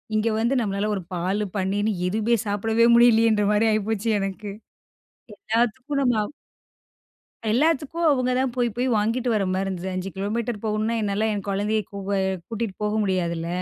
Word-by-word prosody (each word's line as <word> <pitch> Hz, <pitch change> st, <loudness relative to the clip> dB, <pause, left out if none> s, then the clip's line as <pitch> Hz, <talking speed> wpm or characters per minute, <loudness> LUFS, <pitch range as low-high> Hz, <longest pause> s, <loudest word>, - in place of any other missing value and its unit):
இங்க 220 Hz, +1 st, +2 dB
வந்து 235 Hz, +4 st, +1 dB
நம்மளால, 205 Hz, -1 st, -1 dB
ஒரு 190 Hz, -, -4 dB
பாலு, 190 Hz, +5 st, -1 dB
பன்னீர்ன்னு, 205 Hz, +3 st, 0 dB
எதுவுமே 220 Hz, +4 st, +1 dB
சாப்பிடவே 225 Hz, +3 st, +2 dB
முடியலயேன்ற 225 Hz, -3 st, +5 dB
மாதிரி 215 Hz, +2 st, +3 dB
ஆயிப்போச்சு 215 Hz, +1 st, -1 dB
எனக்கு. 195 Hz, +1 st, -4 dB, 0.9 s
எல்லாத்துக்கும் 245 Hz, +5 st, 0 dB
நம்ம 245 Hz, -3 st, +2 dB
அவ் 245 Hz, -, -7 dB, 1.2 s
எல்லாத்துக்கும், 315 Hz, +5 st, +1 dB
அவுங்க 255 Hz, -3 st, +1 dB
தான் 260 Hz, -1 st, 0 dB
போய் 240 Hz, -1 st, +2 dB
போய் 250 Hz, +1 st, 0 dB
வாங்கிட்டு 230 Hz, +4 st, 0 dB
வர 205 Hz, -, +1 dB
மாதிரி 190 Hz, +1 st, -1 dB
இருந்தது. 185 Hz, 0 st, -4 dB
5 185 Hz, +1 st, -3 dB
கிலோமீட்டர் 215 Hz, +2 st, -2 dB
போகணுன்னா, 215 Hz, +1 st, 0 dB
என்னால 210 Hz, +2 st, 0 dB
என் 200 Hz, -1 st, -5 dB
கொழந்தைய, 210 Hz, +2 st, 0 dB
கூ 200 Hz, -, -6 dB, 0.2 s
அ. -, -, +1 dB, 0.3 s
கூட்டிட்டு 225 Hz, -3 st, -3 dB
போக 210 Hz, 0 st, 0 dB
முடியாதுல்ல! 170 Hz, -3 st, -1 dB
215 Hz, 155 wpm, -24 LUFS, 200-235 Hz, 1.2 s, முடியலயேன்ற